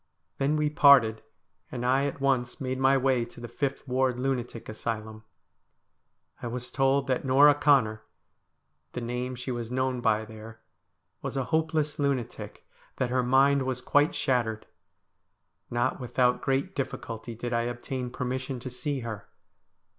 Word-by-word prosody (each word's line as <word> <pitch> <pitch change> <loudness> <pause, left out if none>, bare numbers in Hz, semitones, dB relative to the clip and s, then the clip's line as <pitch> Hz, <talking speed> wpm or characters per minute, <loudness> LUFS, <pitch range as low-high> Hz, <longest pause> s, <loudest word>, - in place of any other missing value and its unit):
Then 140 +2 +2
we 150 -1 +1
parted, 135 -7 +6 0.5
and 120 0 -4
I 135 +2 +3
at 140 - -5
once 135 -2 0
made 130 -2 -3
my 135 +1 +4
way 130 -2 +2
to 120 - -14
the 120 - -7
Fifth 140 +4 -3
Ward 130 -1 +1
Lunatic 125 -3 -3
Asylum. 110 0 -5 1.2
I - - -4
was 125 +1 -5
told 135 0 +2
that 130 -1 0
Norah 140 +2 +6
Connor 135 -7 +3 0.5
— 75 +1 -49
the 125 - -4
name 125 +2 -3
she 125 +1 -5
was 120 -2 -4
known 130 0 -1
by 110 -1 +2
there 110 0 -11 0.3
— 90 +1 -51
was 135 0 -4
a 135 - +1
hopeless 155 -1 0
lunatic; 140 -5 -3 0.3
that 125 -1 -1
her 130 0 +2
mind 135 +3 +4
was 130 -1 -2
quite 145 +4 +2
shattered. 115 -5 0 1.0
Not 120 0 0
without 125 0 +1
great 135 +8 0
difficulty 115 - -5
did 120 +2 -4
I 115 0 +1
obtain 125 +1 -4
permission 130 +1 -3
to 130 - -6
see 135 +2 -3
her. 115 -3 -7
125 Hz, 155 wpm, -28 LUFS, 120-135 Hz, 1.2 s, parted